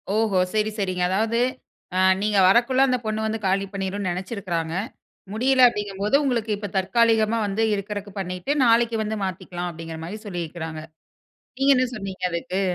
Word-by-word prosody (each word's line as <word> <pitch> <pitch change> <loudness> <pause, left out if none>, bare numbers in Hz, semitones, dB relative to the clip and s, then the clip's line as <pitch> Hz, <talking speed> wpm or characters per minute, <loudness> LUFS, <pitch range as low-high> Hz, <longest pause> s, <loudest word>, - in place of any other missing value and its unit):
ஓஹோ, 215 -4 +2 0.2
சரி, 215 0 +1
சரிங்க. 185 -2 -1
அதாவது, 220 +4 +1 0.6
அ - - +2 0.2
நீங்க 210 -1 +1
வரகுள்ள 245 +6 +4
அந்த 250 -1 +2
பொண்ணு 215 0 -1
வந்து 220 0 -2
காலி 195 +1 +1
பண்ணிரும்ணு 195 0 -2
நெனச்சிருக்கிறாங்க. 180 -4 -3 0.6
முடியல 255 +2 +4
அப்படிங்கும் 205 -4 -4
போது, 210 +7 +2
உங்களுக்கு 230 -5 0
இப்ப 205 -2 -6
தற்காலிகமா 225 +2 +2
வந்து 205 +3 -1
இருக்கறதுக்கு 205 0 -4
பண்ணிட்டு, 185 +7 -3
நாளைக்கு 230 0 +3
வந்து 215 0 -3
மாத்திக்கிலாம் 180 -1 -5
அப்படிங்கிற 165 0 -8
மாரி 210 +5 -6
சொல்லியிருக்கிறாங்க. 165 -3 -5 0.8
நீங்க 275 +1 +5
என்ன 255 - +3
சொன்னீங்க 195 -3 -7
அதுக்கு? 175 +3 -2
205 Hz, 150 wpm, -23 LUFS, 185-225 Hz, 0.8 s, நீங்க